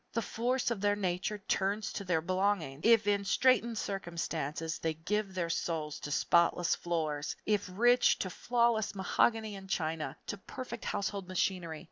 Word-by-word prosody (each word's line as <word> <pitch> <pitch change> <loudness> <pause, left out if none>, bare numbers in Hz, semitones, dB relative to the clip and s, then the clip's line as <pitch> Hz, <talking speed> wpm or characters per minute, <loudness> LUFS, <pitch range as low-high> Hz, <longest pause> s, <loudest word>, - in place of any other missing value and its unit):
The 230 - 0
force 245 +3 0
of 215 -5 -2
their 205 0 +3
natures 190 +1 -2
turns 200 +2 0
to 200 - -4
their 175 -4 +1
belongings. 185 -5 0
If 230 -2 +6
in 200 -1 +2
straitened 235 +1 +3
circumstances 165 -5 -3
they 160 -1 -1
give 195 +4 -2
their 170 -2 -1
souls 155 -3 -2
to - - -6
spotless 170 +3 +3
floors; 155 -4 -2
if 210 -3 0
rich, 240 +6 +4
to 185 - -3
flawless 235 -2 +1
mahogany 215 +3 +1
and 195 -1 -10
china, 160 -3 -2
to 205 - -4
perfect 235 +3 -7
household 200 -2 -2
machinery. 180 -3 -1
195 Hz, 155 wpm, -32 LUFS, 170-215 Hz, -, If